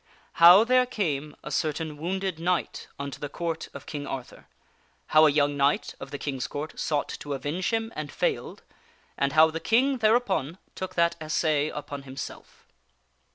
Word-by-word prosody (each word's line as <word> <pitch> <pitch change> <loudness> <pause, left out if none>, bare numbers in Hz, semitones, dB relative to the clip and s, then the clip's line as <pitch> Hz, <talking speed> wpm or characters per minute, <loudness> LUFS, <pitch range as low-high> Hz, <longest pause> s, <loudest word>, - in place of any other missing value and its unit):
How 175 +5 +10
There 250 +1 +3
Came 150 - -2
a 150 - -7
Certain 155 +1 -1
Wounded 185 +2 -3
Knight 180 +1 -1
Unto 140 -1 -6
the 145 - -5
Court 165 +1 -4
of - - -10
King 145 -2 -5
Arth^lr, 135 -3 -7 0.6
How 155 0 +6
a - - +4
Young 145 0 +2
Kinght 140 +1 +1
of - - -8
the 140 - -5
Kings 135 -3 -3
Court 150 +2 -5
Sought 150 -2 -1
To 145 -1 -4
Avenge 150 +7 -2
Him 225 0 -2
and 150 -1 -5
Failed - - -2 0.5
and 140 0 0
How 160 +1 +6
the 165 - -4
King 255 +7 +2
There 220 0 +5
upon 190 - -1 0.2
Took 185 -1 -6
That 170 0 +2
Assay 155 -1 +1
Upon 145 -1 -6
Himself. 135 0 -9
155 Hz, 170 wpm, -27 LUFS, 145-185 Hz, 0.6 s, How